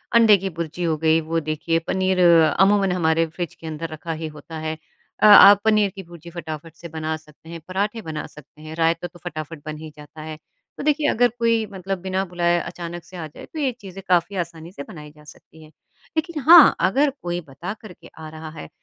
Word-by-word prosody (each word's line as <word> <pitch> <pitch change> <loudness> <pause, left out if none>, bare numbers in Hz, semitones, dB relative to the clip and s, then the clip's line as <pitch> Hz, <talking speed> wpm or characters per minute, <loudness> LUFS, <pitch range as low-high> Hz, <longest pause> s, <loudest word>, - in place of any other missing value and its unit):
अंडे 225 -3 +7
की 195 +1 -4
भुर्जी 170 +1 -4
हो 160 -2 0
गई, 160 +1 +3
वो 165 +1 -1
देखिए 155 +1 -1
पनीर 190 0 +1
अमूमन 185 +4 +4
हमारे 165 -2 +2
फ्रिज 170 +1 -6
के 160 - -11
अंदर 160 +1 -5
रखा 155 +1 -7
ही 160 - -3
होता 160 +2 -9
है 155 0 -3 0.4
अ, - - +3
आप 205 -1 +9
पनीर 210 -2 +3
की 195 - -8
भुर्जी 170 0 -13
फटाफट 160 -1 -8
से 170 0 -10
बना 160 0 -3
सकते 155 +1 -19
हैं, 170 0 -7
पराठे 205 +4 -2
बना 155 -5 -6
सकते 150 0 -17
हैं, 155 0 -9
रायता 165 +1 0
तो 175 0 -18
फटाफट 155 -2 -7
बन 155 0 -6
ही 155 0 -9
जाता 150 +1 -12
है। 155 0 -7 0.4
तो - - -6
देखिए, 300 0 +1
अगर 245 -2 +3
कोई 230 -1 +2
मतलब 190 0 -4
बिना 190 +1 -1
बुलाए 175 -1 0
अचानक 170 0 -7
से 180 +2 -12
आ 160 - -5
जाए, 150 - -12
तो 315 - -9
ये 270 -3 +1
चीज़ें 195 -1 -9
काफ़ी 180 +2 +2
आसानी 165 0 -13
से 140 - -8
बनाई 150 -1 -11
जा 150 0 -19
सकती 160 +1 -16
हैं। 155 - -16 0.5
लेकिन 320 0 -2
हाँ, 340 -3 +9
अगर 280 +8 +2
कोई 175 0 -3
बता 155 +7 -7
करके 210 -5 -13
आ 155 -1 -8
रहा 155 0 -9
है, 80 - -8
170 Hz, 215 wpm, -22 LUFS, 160-190 Hz, 0.5 s, आप